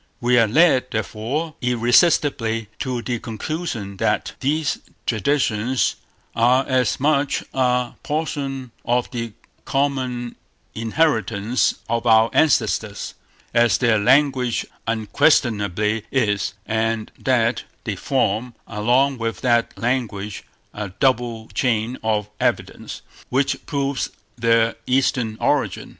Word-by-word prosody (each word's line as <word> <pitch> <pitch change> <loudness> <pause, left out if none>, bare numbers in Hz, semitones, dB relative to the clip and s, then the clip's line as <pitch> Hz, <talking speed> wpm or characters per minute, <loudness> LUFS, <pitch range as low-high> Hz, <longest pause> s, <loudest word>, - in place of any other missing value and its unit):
We 120 0 +3
are 115 - +4
led, 130 +1 +4
therefore, 115 +9 -3
irresistibly 120 - +2
to 125 -3 -3
the 120 -2 -2
conclusion, 115 - -5
that - - 0
these 150 +2 0 0.3
traditions 120 -1 +1 0.4
are 125 +3 +3
as 130 -5 +1
much 145 0 +1
a 125 -2 +1
portion 140 -4 -3
of 125 +2 0
the 115 -3 -4 0.3
common 130 -3 -1 0.4
inheritance 115 - +1
of 115 +1 -1
our 110 0 +5
ancestors, 155 -4 +1 0.4
as 120 0 +4
their 115 -4 +3
language 130 +1 +2 0.2
unquestionably 110 - +1
is; 105 -6 0
and 110 0 -1
that 120 -2 +1 0.2
they 105 -5 -3
form, 120 +1 -1
along 125 +5 +1
with 115 0 -3
that 120 -2 +1
language, 115 -5 -2 0.3
a 105 -2 -5
double 120 -4 +1
chain 120 -2 0
of 105 -2 0
evidence, - - -2 0.3
which 135 +2 0
proves 140 -2 -1 0.3
their 115 -1 +3
Eastern 125 -4 +1
origin. - - 0
120 Hz, 105 wpm, -21 LUFS, 110-135 Hz, 0.4 s, our